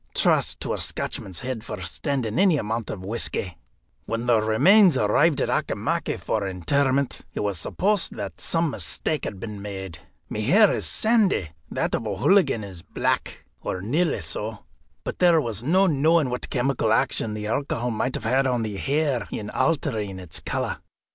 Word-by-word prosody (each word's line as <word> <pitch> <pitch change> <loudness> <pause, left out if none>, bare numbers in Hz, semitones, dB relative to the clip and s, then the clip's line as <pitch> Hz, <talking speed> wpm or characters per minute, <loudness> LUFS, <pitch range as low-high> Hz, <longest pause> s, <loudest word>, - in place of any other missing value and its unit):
Trust - - +2
to - - -2
a - - -3
Scotchman's 95 -3 -3
head 125 -3 -4
for 105 -3 -6
standing 120 - -2
any 190 -5 +5
amount 110 -2 -3
of 95 -2 -6
whisky. 100 -4 -2 0.5
When 115 +1 -2
the 120 -3 +4
remains 160 - +5
arrived 140 +9 +3
at - - 0
Auchimachie - - -1
for 105 -3 -1
interment, 135 - 0
it - - -2
was 100 -4 -1
supposed 200 - 0
that 100 -3 -6
some 165 -2 +1
mistake 155 +2 -1
had 100 - -5
been 105 -2 -6
made. 95 -5 -6 0.3
My - - -5
hair 190 - +5
is - - -2
sandy, 215 - +2 0.2
that - - -2
of 115 - -1
O'Hooligan 110 - +3
is 95 -4 -9
black, - - -2 0.2
or 95 - -3
nearly 150 - 0
so; 110 0 -4 0.4
but - - -5
there 175 -2 +5
was 115 -6 -3
no 185 +8 +4
knowing 155 -3 +3
what 125 - -4
chemical 125 -3 0
action 110 -1 +1
the 105 0 -5
alcohol 120 +1 -1
might 125 +3 -1
have 130 +5 +1
on 125 -3 0
the 105 -2 -4
hair 140 -2 0
in 105 -1 -5
altering 110 - -1
its 90 -3 -4
colour. - - -3
115 Hz, 165 wpm, -24 LUFS, 105-150 Hz, 0.5 s, any